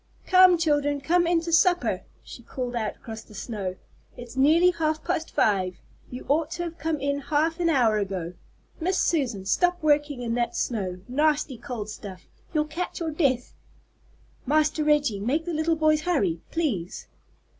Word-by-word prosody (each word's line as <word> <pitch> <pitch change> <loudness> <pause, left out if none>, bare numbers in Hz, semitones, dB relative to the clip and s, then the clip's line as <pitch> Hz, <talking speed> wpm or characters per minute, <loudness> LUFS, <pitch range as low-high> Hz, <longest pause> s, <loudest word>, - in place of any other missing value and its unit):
"Come, 370 -1 +6
children, 290 -3 +1
come 345 +5 +2
in 340 -1 +2
to 335 0 -4
supper," 355 +2 +3 0.2
she - - -11
called 245 +1 -5
out 220 -3 -2
across 220 -1 -9
the 215 - -16
snow. 200 -4 -4 0.4
"It's 240 0 -10
nearly 320 +7 +5
half 310 -2 -1
past 335 -2 -2
five. 185 -4 +1 0.3
You 250 - -8
ought 305 +2 +1
to 345 - -3
have 340 -1 -7
come 320 -2 -1
in 280 +1 -1
half 310 +4 0
an 340 -1 +2
hour 235 -8 +3
ago. 185 -4 -3 0.5
Miss 365 +3 0
Susan, 250 - 0
stop 355 - +2
working 295 -3 +2
in 230 -1 -2
that 240 0 -1
snow, 185 -6 -2
nasty 285 -1 0
cold 240 -7 -5
stuff; 200 -3 -9 0.3
you'll 305 -2 +1
catch 325 +4 -5
your 325 -2 -2
death. 275 -6 0 0.9
Master 305 +2 +2
Reggie, 290 -8 +2
make 270 +10 -1
the 345 - -3
little 320 +1 +1
boys 310 -1 +2
hurry, 200 - 0
please." 230 - -2
290 Hz, 165 wpm, -25 LUFS, 230-325 Hz, 0.9 s, Come